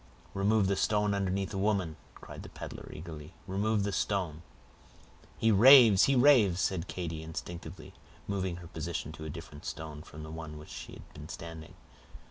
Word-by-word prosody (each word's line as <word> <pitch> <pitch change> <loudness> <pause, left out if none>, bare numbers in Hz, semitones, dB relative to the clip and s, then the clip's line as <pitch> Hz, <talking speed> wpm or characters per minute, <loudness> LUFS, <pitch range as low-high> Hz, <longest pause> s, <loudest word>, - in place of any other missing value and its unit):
"Remove 100 +1 +2
the 100 +1 +1
stone 105 +1 +1
underneath 95 -1 -1
the 95 - -3
woman," 95 -6 0 0.2
cried - - -10
the - - -10
peddler, - - -9
eagerly—"remove 95 +7 -3
the 100 - -1
stone." 90 -6 -1 1.0
"He 115 - +3
raves! 115 -2 +8
he 140 - +3
raves!" 120 -9 +5
said 95 -1 -1
Katy, 85 -3 -4
instinctively 80 +1 -8 0.3
moving 95 -3 -2
her 85 -1 -10
position 80 -2 -4
to 80 0 -9
a - - -4
different 75 -1 -9
stone 75 -2 -6
from 75 0 -11
the 80 - -8
one 80 -1 -7
on - - -9
which 75 - -12
she - - -8
had - - -13
been 75 +1 -10
standing. 80 -2 -8
90 Hz, 170 wpm, -31 LUFS, 80-100 Hz, 1.0 s, raves